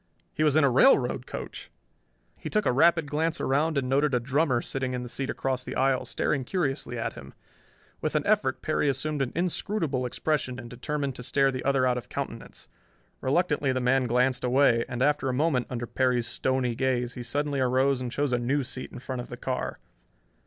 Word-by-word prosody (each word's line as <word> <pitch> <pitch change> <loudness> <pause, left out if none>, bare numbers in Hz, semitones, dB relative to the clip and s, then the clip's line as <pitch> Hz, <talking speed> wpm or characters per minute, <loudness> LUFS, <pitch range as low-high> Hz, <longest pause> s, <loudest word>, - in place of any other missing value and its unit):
He 155 - 0
was 150 -2 +3
in 155 - +5
a 140 - +5
railroad 140 - +4
coach! - - -7 0.7
He - - -7
took 210 -1 +1
a - - +3
rapid 165 +5 +4
glance 160 +3 -1
around 150 +3 +1
and 135 -2 0
noted 135 +1 +2
a - - +3
drummer 135 +1 +1
sitting 130 +1 -3
in 125 - -3
the - - -6
seat 135 +3 -3
across 130 -1 -1
the - - -6
aisle, 135 -1 +2
staring 140 -3 -1
curiously 135 -5 -2
at 115 - -2
him. - - -12 0.7
With - - -2
an - - +1
effort - - +1
Perry 145 - +1
assumed 145 +2 -1
an 130 - -1
inscrutable 165 -6 -1
expression 130 -1 -1
and 120 -1 -9
determined 140 +2 -3
to - - -7
stare 135 +2 +2
the 130 -1 -4
other 135 -2 +2
out 125 -1 +2
of 120 - -14
countenance. - - -6 0.5
Reluctantly 145 -1 +1
the 130 - 0
man 125 +1 +2
glanced 125 +2 +1
away, 125 -2 +3
and 120 +1 -1
after 145 -2 +2
a - - 0
moment, 140 -3 +1
under 120 -2 -3
Perry's 125 -1 +1
stony 130 0 0
gaze, 125 0 0
he 125 - -7
suddenly 145 +3 -1
arose 130 +1 +2
and 125 -1 -4
chose 140 0 0
a 120 - +2
new 135 +4 0
seat 130 +1 -6
in - - -9
front 130 0 -5
of - - -10
the - - -7
car. - - -3
130 Hz, 205 wpm, -27 LUFS, 125-145 Hz, 0.7 s, in